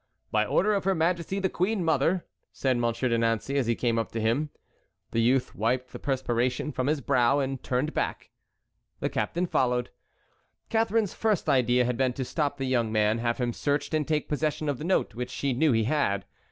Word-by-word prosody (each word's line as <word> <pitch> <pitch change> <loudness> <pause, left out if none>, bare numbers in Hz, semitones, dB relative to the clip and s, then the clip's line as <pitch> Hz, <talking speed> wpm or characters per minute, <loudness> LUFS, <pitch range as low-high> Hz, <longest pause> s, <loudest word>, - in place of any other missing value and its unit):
"By - - +2
order 210 +2 +2
of 200 - 0
her 195 -1 +2
majesty 170 +3 0
the 195 -1 +1
queen 190 +2 0
mother," 165 +3 +2 0.3
said 130 -2 0
Monsieur 120 +1 0
de 115 -1 +1
Nancey, 115 +4 0
as 135 -4 +1
he 115 - +2
came 115 -1 0
up 115 - -3
to 115 - -2
him. 120 +8 +1 0.6
The 115 - +1
youth 125 +2 +2
wiped 125 +4 -1
the - - -6
perspiration 125 0 -1
from 130 -2 -2
his 150 -1 +1
brow 135 -1 +3
and 135 -2 -2
turned 130 +5 -1
back. - - -3 0.7
The - - -1
captain 175 +2 -1
followed. 125 -6 0 0.8
Catharine's 225 -2 +1
first 215 -5 0
idea 125 -1 +3
had 125 -1 -1
been 130 -2 +1
to 130 +1 -3
stop 145 0 -1
the 135 - -2
young 120 -4 +1
man, 110 +1 +2
have 115 0 0
him 120 -2 -1
searched, 145 +4 -1
and 155 -2 +1
take 155 -1 0
possession 155 +1 -1
of 140 - -2
the - - -5
note 185 +3 +1
which 125 +1 -4
she 135 +2 -1
knew 150 +4 +3
he 115 -2 +2
had. 105 -7 0
130 Hz, 205 wpm, -27 LUFS, 120-155 Hz, 0.8 s, brow